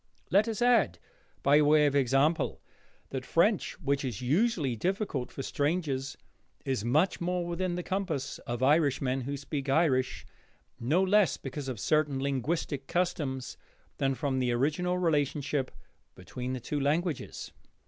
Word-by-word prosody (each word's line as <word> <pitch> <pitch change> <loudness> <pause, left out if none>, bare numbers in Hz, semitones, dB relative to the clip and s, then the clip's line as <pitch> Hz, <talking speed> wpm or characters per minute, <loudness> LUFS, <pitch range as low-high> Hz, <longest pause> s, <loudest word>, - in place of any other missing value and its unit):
Let 200 +5 +4
us 225 0 -1
add, 225 - +3 0.5
by 145 +2 +5
way 150 0 +5
of 145 -1 +1
example, 140 +4 +2 0.5
that 130 -1 -3
French, 190 - +1
which 140 -1 0
is 125 -7 -3
usually 150 - +1
difficult 180 - -2
for 135 - -6
strangers, 145 -3 -1 0.5
is 130 -6 -1
much 155 +12 +2
more 180 0 -1
within 175 +1 -2
the 180 - -3
compass 185 -8 -3
of 120 +1 -2
Irishmen 135 -3 +2
who 140 +3 -4
speak 140 0 -4
Irish, 135 -3 +1 0.5
no 155 +11 +2
less 200 0 +3
because 135 +1 -6
of 125 -5 -4
certain 150 +3 +1
linguistic 140 +1 -2
customs 145 -8 -2 0.4
than 135 0 +1
from 135 -2 -1
the 125 -1 +1
original 155 +8 0
relationship 145 -4 0 0.5
between 125 +1 -6
the 130 - -3
two 145 +5 -3
languages. 155 +2 -2
145 Hz, 140 wpm, -29 LUFS, 130-175 Hz, 0.5 s, by